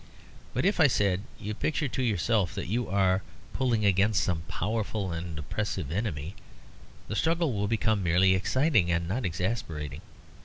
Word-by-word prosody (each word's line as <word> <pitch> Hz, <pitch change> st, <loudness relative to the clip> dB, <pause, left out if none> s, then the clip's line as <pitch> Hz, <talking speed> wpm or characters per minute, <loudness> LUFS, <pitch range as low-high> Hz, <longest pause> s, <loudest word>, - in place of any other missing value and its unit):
"But -, -, +1 dB
if," 200 Hz, -1 st, +2 dB
I 155 Hz, -, +7 dB
said, 100 Hz, -6 st, +1 dB, 0.2 s
"you 105 Hz, +2 st, -4 dB
picture 150 Hz, +6 st, -1 dB
to 130 Hz, -, -3 dB
yourself 105 Hz, -4 st, +1 dB
that -, -, -3 dB
you 115 Hz, +7 st, -1 dB
are 95 Hz, -1 st, +2 dB, 0.3 s
pulling 120 Hz, -5 st, +1 dB
against 100 Hz, +2 st, +3 dB
some 85 Hz, -3 st, 0 dB
powerful 105 Hz, -1 st, -2 dB
and 85 Hz, -1 st, -5 dB
oppressive 75 Hz, -1 st, -3 dB
enemy, 90 Hz, -4 st, -2 dB, 0.7 s
the 105 Hz, -, -4 dB
struggle 165 Hz, +1 st, +1 dB
will 105 Hz, -1 st, -1 dB
become 110 Hz, -1 st, +1 dB
merely 90 Hz, +2 st, +4 dB
exciting 110 Hz, -, +2 dB
and 85 Hz, -1 st, 0 dB
not 105 Hz, +3 st, -1 dB
exasperating. 85 Hz, -, -3 dB
100 Hz, 155 wpm, -28 LUFS, 90-115 Hz, 0.7 s, I